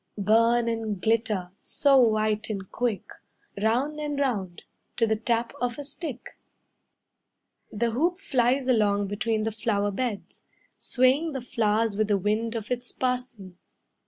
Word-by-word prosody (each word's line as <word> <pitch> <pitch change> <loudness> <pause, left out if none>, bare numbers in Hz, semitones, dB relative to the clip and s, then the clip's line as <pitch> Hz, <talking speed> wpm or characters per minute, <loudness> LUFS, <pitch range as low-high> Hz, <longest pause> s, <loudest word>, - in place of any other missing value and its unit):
Burn 230 +3 +3
and 225 -3 -2
glitter, 215 -4 0
so 280 -2 +3
white 215 -2 +2
and 195 -3 -5
quick, 240 -5 -1 0.6
Round 255 +8 +1
and 295 -1 -3
round, 200 -11 -2 0.3
to 230 - +3
the 220 0 +1
tap 230 +1 -1
of 245 -1 -1
a 290 - -5
stick." 285 -3 -7 1.3
The 230 +2 0
hoop 335 +10 +1
flies 265 -8 +1
along 205 -5 +2
between 215 +1 -1
the 220 - -1
flower 205 -2 0
beds, 220 -1 -4 0.4
Swaying 270 +5 +2
the 265 - -3
flowers 225 -2 0
with 215 0 +1
the 205 -1 +2
wind 215 +4 -1
of 220 0 -5
its 245 0 -3
passing. 250 -8 -3
230 Hz, 140 wpm, -26 LUFS, 210-250 Hz, 1.3 s, Burn